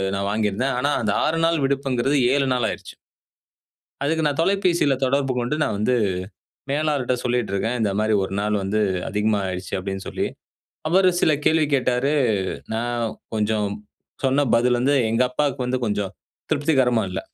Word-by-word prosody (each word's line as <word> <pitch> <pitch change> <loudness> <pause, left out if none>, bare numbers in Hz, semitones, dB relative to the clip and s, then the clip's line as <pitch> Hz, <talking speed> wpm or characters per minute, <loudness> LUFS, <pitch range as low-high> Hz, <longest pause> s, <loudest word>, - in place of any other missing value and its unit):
நான் 100 0 -2
வாங்கியிருந்தேன். 110 +5 0
ஆனா, 140 +3 +1
அந்த 105 -2 0
6 160 +2 0
நாள் 165 -3 +1
விடுப்புங்கிறது 135 0 0 0.2
7 140 -1 +1
நாள் 120 -3 0
ஆயிருச்சு. - - -7 1.1
அதுக்கு 160 +1 +1
நான் 145 +2 0
தொலைபேசியில 175 -7 +2
தொடர்பு 135 0 +1
கொண்டு 120 +5 -1
நான் 105 - 0
வந்து 125 +4 +1 0.8
மேலாளர்ட்ட 145 -4 0
சொல்லிட்டு 120 -4 0
இருக்கேன். 115 +5 -1
"இந்தமாரி 105 +1 +1
ஒரு 95 - -4
நாள் 105 0 0
வந்து 105 +3 0 0.3
அதிகமா 105 +1 +1
ஆயிடுச்சு" 90 0 -5
அப்பிடின்னு 95 0 -5
சொல்லி. - - -2 0.6
அவரு 185 +2 +4
சில 155 - +4
கேள்வி 155 -1 +3
கேட்டாரு. 130 +2 +1 0.6
நான் 120 +1 -1 0.3
கொஞ்சம் 105 -1 0 0.6
சொன்ன 135 +2 +3
பதில 120 +1 +3
வந்து 140 +2 +3
எங்க 115 +3 +2
அப்பாவுக்கு 135 -1 -1
வந்து 130 +1 0
கொஞ்சம் 105 -2 -2 0.4
திருப்திகரமா 135 -6 +2
இல்ல. 95 - -3
125 Hz, 150 wpm, -22 LUFS, 105-145 Hz, 1.1 s, அவரு